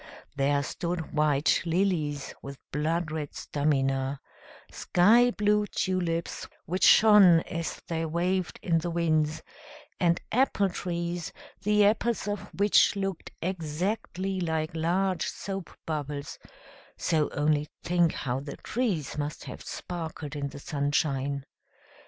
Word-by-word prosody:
There 140 Hz, +1 st, +2 dB
stood 170 Hz, +1 st, -4 dB
white 150 Hz, -1 st, +3 dB
lilies 165 Hz, -5 st, 0 dB
with 140 Hz, 0 st, -8 dB
blood 160 Hz, +2 st, -1 dB
red 155 Hz, -2 st, -4 dB
stamina, 135 Hz, -2 st, 0 dB, 0.5 s
skyblue 210 Hz, +1 st, +3 dB
tulips, 170 Hz, -3 st, -2 dB, 0.2 s
which 185 Hz, +4 st, -2 dB
shone 205 Hz, -6 st, +8 dB
as 165 Hz, -1 st, -5 dB
they 165 Hz, -1 st, -2 dB
waved 180 Hz, +3 st, -1 dB
in 165 Hz, -2 st, +2 dB
the 175 Hz, +2 st, -3 dB
winds, 155 Hz, -2 st, +1 dB, 0.6 s
and 170 Hz, -2 st, +3 dB
apple 220 Hz, -5 st, +2 dB
trees, 175 Hz, -1 st, -3 dB, 0.3 s
the 210 Hz, +1 st, +4 dB
apples 225 Hz, +2 st, +1 dB
of 205 Hz, 0 st, -4 dB
which 205 Hz, +1 st, +4 dB
looked 195 Hz, -3 st, -3 dB
exactly 185 Hz, +3 st, -2 dB
like 160 Hz, -2 st, -1 dB
large 175 Hz, +2 st, 0 dB
soapbubbles: 150 Hz, -7 st, -5 dB, 0.6 s
so 155 Hz, -3 st, +1 dB
only 150 Hz, 0 st, +1 dB, 0.2 s
think 175 Hz, -2 st, +2 dB
how 130 Hz, -1 st, -2 dB
the 140 Hz, +1 st, -7 dB
trees 190 Hz, -, -2 dB
must 145 Hz, +1 st, -4 dB
have 125 Hz, -, -8 dB
sparkled 160 Hz, -4 st, -6 dB
in 145 Hz, -1 st, -2 dB
the -, -, -10 dB
sunshine! 140 Hz, -1 st, -1 dB
165 Hz, 115 wpm, -28 LUFS, 150-185 Hz, 0.6 s, shone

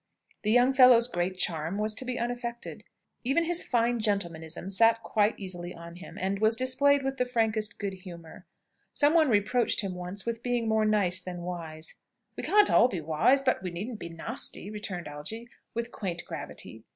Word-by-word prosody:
The 210 Hz, -, -1 dB
young 245 Hz, +4 st, +5 dB
fellow's 250 Hz, -3 st, +7 dB
great 180 Hz, -4 st, -2 dB
charm 165 Hz, +1 st, -1 dB
was 215 Hz, +1 st, 0 dB
to 240 Hz, +4 st, -4 dB
be 250 Hz, 0 st, -3 dB
unaffected. 240 Hz, 0 st, -4 dB, 0.4 s
Even 275 Hz, +7 st, +2 dB
his 345 Hz, +1 st, +2 dB
fine 240 Hz, -1 st, +1 dB
gentlemanism 175 Hz, -4 st, -2 dB
sat 225 Hz, +3 st, +4 dB
quite 210 Hz, 0 st, +1 dB
easily 180 Hz, -2 st, -6 dB
on 170 Hz, 0 st, -10 dB
him, 185 Hz, -, -11 dB
and 195 Hz, +2 st, -1 dB
was 220 Hz, +1 st, +3 dB
displayed 275 Hz, +3 st, +3 dB
with 270 Hz, 0 st, -2 dB
the 250 Hz, -, +2 dB
frankest 220 Hz, -4 st, -1 dB
good 200 Hz, -2 st, -3 dB
humour. 175 Hz, -3 st, -11 dB, 0.5 s
Some 290 Hz, +1 st, +3 dB
one 320 Hz, -4 st, +5 dB
reproached 215 Hz, +3 st, +2 dB
him 195 Hz, -3 st, -3 dB
once 180 Hz, +2 st, -6 dB
with 230 Hz, -1 st, -3 dB
being 245 Hz, -2 st, -1 dB
more 220 Hz, 0 st, +2 dB
nice 200 Hz, -4 st, +2 dB
than 180 Hz, -1 st, -7 dB
wise. 165 Hz, -3 st, -6 dB, 0.4 s
"We -, -, -5 dB
can't 415 Hz, 0 st, +4 dB
all 240 Hz, -, +6 dB
be 190 Hz, -8 st, -4 dB
wise, 160 Hz, -, +2 dB
but 255 Hz, -, +1 dB
we 185 Hz, -, -3 dB
needn't 210 Hz, +7 st, -6 dB
be 170 Hz, -, -6 dB
nasty!" 165 Hz, +4 st, -4 dB
returned 200 Hz, -5 st, -5 dB
Algy, 185 Hz, +12 st, -7 dB, 0.3 s
with 235 Hz, +1 st, -3 dB
quaint 175 Hz, -7 st, -4 dB
gravity. -, -, -8 dB
215 Hz, 185 wpm, -28 LUFS, 180-245 Hz, 0.5 s, fellow's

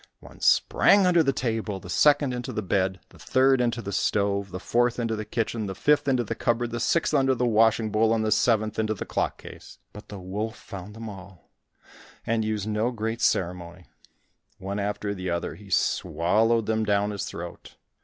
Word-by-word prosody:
One -, -, -15 dB
sprang 200 Hz, -1 st, +4 dB
under 175 Hz, -2 st, +4 dB
the 135 Hz, -3 st, +2 dB
table, 110 Hz, -6 st, -2 dB
the 90 Hz, -, -12 dB
second 145 Hz, -, +3 dB
into 125 Hz, -1 st, -4 dB
the 110 Hz, -, -3 dB
bed, 95 Hz, 0 st, 0 dB
the -, -, -19 dB
third 130 Hz, 0 st, +3 dB
into 120 Hz, -1 st, -1 dB
the 100 Hz, -, -5 dB
stove, 100 Hz, -1 st, 0 dB
the 90 Hz, 0 st, -6 dB
fourth 120 Hz, +4 st, +1 dB
into 115 Hz, -2 st, -1 dB
the 105 Hz, 0 st, -5 dB
kitchen, 110 Hz, -1 st, -2 dB
the 95 Hz, -, -5 dB
fifth 150 Hz, +7 st, +2 dB
into 130 Hz, -3 st, +2 dB
the 105 Hz, -, -4 dB
cupboard, 120 Hz, 0 st, -1 dB
the 120 Hz, -, -3 dB
sixth 160 Hz, +7 st, +1 dB
under 135 Hz, -2 st, +3 dB
the 125 Hz, -, 0 dB
washing 110 Hz, -1 st, +3 dB
bowl, 110 Hz, +1 st, +2 dB
and 110 Hz, -1 st, +1 dB
the 110 Hz, -, 0 dB
seventh 110 Hz, -1 st, +2 dB
into 110 Hz, 0 st, 0 dB
the -, -, -6 dB
clock -, -, -2 dB
case. -, -, -12 dB, 0.2 s
But 105 Hz, -, -11 dB
the 105 Hz, -, -8 dB
wolf 105 Hz, +5 st, -4 dB
found 100 Hz, 0 st, -10 dB
them 115 Hz, 0 st, -7 dB
all, 95 Hz, -3 st, -12 dB, 0.7 s
and 115 Hz, -1 st, 0 dB
used 110 Hz, -1 st, -2 dB
no 110 Hz, +2 st, 0 dB
great 115 Hz, 0 st, -4 dB
ceremony; 90 Hz, -2 st, -1 dB, 0.7 s
one 100 Hz, +2 st, -4 dB
after 100 Hz, 0 st, -2 dB
the 95 Hz, -2 st, -5 dB
other 85 Hz, 0 st, -2 dB
he 100 Hz, -1 st, -14 dB
swallowed 110 Hz, +8 st, +1 dB
them 110 Hz, 0 st, 0 dB
down 105 Hz, 0 st, +1 dB
his 100 Hz, -2 st, -4 dB
throat. -, -, -9 dB
110 Hz, 195 wpm, -26 LUFS, 100-120 Hz, 0.7 s, sprang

